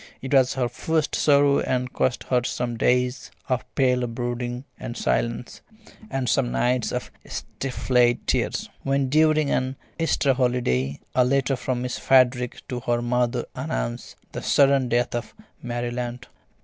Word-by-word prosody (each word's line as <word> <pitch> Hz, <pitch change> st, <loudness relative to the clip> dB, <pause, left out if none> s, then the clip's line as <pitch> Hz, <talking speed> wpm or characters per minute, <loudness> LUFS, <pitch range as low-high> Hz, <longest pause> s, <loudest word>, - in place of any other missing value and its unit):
It 135 Hz, +1 st, -5 dB
was 130 Hz, -2 st, +4 dB
her 130 Hz, -2 st, +1 dB
first 155 Hz, +5 st, -1 dB
sorrow 140 Hz, -1 st, +4 dB
and 125 Hz, 0 st, -1 dB
cost 125 Hz, -, 0 dB
her 125 Hz, -1 st, +1 dB
some 120 Hz, -1 st, -2 dB
days 125 Hz, +2 st, +1 dB, 0.2 s
of 130 Hz, -2 st, 0 dB
pale 125 Hz, -2 st, +2 dB
brooding 120 Hz, +1 st, -4 dB, 0.2 s
and 120 Hz, -, -6 dB
silence, 115 Hz, +1 st, -1 dB, 0.5 s
and 135 Hz, -2 st, -2 dB
some -, -, +2 dB
nights 120 Hz, -, +1 dB
of -, -, -4 dB
stifled 125 Hz, -2 st, 0 dB
tears, -, -, 0 dB
when 135 Hz, -1 st, 0 dB
during 155 Hz, 0 st, +3 dB
an 130 Hz, +1 st, 0 dB, 0.2 s
Easter 150 Hz, -4 st, +2 dB
holiday 120 Hz, -, 0 dB
a 125 Hz, -, +4 dB
letter 135 Hz, +1 st, +1 dB
from 125 Hz, -1 st, -2 dB
Miss 125 Hz, -, -3 dB
Frederick 125 Hz, -2 st, +3 dB
to 125 Hz, -, -3 dB
her 120 Hz, -1 st, -1 dB
mother 120 Hz, 0 st, 0 dB
announced -, -, -4 dB, 0.2 s
the -, -, -5 dB
sudden 135 Hz, -2 st, +3 dB
death 120 Hz, +1 st, +1 dB
of 120 Hz, -1 st, -4 dB, 0.3 s
Mary 120 Hz, 0 st, -3 dB
Lant. 125 Hz, +1 st, -4 dB
125 Hz, 150 wpm, -24 LUFS, 120-135 Hz, 0.5 s, was